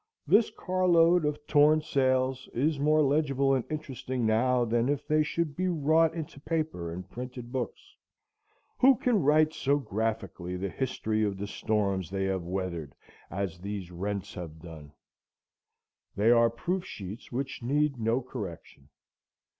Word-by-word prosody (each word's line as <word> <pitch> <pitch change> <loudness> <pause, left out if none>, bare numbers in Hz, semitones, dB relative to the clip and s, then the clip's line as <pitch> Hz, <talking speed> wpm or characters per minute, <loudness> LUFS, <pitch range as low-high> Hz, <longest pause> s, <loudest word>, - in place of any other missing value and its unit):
This 205 +9 +4
car 185 0 -1
load 170 -1 +5
of 150 0 -2
torn 150 +1 +5
sails 130 -3 0
is 145 +4 +1
more 155 +2 +4
legible 140 -1 +2
and 130 -3 +1
interesting 130 -5 -3
now 120 +3 +2
than 120 +2 +1
if 145 0 -1
they 155 0 +3
should 155 -1 -1
be 185 +3 0
wrought 160 0 +3
into 155 -4 -6
paper 155 - -2
and 90 +3 -7
printed 125 +2 -8
books. 125 -5 -5 0.8
Who 265 +1 +7
can 230 -3 +1
write 155 +2 +4
so 140 +1 +1
graphically 110 -7 -3
the 95 +2 -3
history 110 -2 -1
of 100 -2 -1
the 100 - -4
storms 100 -4 -1
they 95 0 -1
have 95 -1 -1
weathered 90 -6 -4 0.3
as 95 -3 -3
these 100 -2 -5
rents 100 +2 -4
have 80 -3 -8
done? 80 -3 -11 1.2
They 105 +4 +4
are 115 -1 +5
proof 175 +11 -2
sheets 100 - -8
which 130 +2 -4
need 140 +2 +1
no 115 +3 +1
correction. 90 - -8
125 Hz, 150 wpm, -29 LUFS, 100-150 Hz, 1.2 s, Who